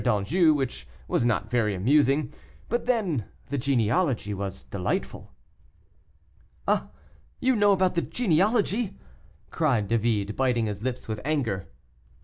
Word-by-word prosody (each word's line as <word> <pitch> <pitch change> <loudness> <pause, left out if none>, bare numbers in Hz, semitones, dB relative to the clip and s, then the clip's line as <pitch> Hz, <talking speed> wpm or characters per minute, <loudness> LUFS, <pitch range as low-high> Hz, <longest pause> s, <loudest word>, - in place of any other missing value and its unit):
d'Anjou, 130 - +3
which 135 -4 -3 0.2
was - - +1
not 120 -3 0
very 110 -5 +1
amusing; 135 +6 +2 0.4
but 240 +1 -1
then 190 - +1 0.2
the 140 - -1
genealogy 120 - +1
was 95 -1 -5
delightful." 90 -3 -3 1.4
"Ah! - - +1 0.5
you 260 0 +2
know 205 -2 +4
about 185 -1 +3
the 170 - +1
genealogy?" 210 +2 +1 0.5
cried 130 -11 +1
David, 110 -2 0
biting 125 -3 +1
his 105 -1 -4
lips 125 +1 -4
with 110 -1 -4
anger. 125 - -1
130 Hz, 125 wpm, -26 LUFS, 105-175 Hz, 1.4 s, know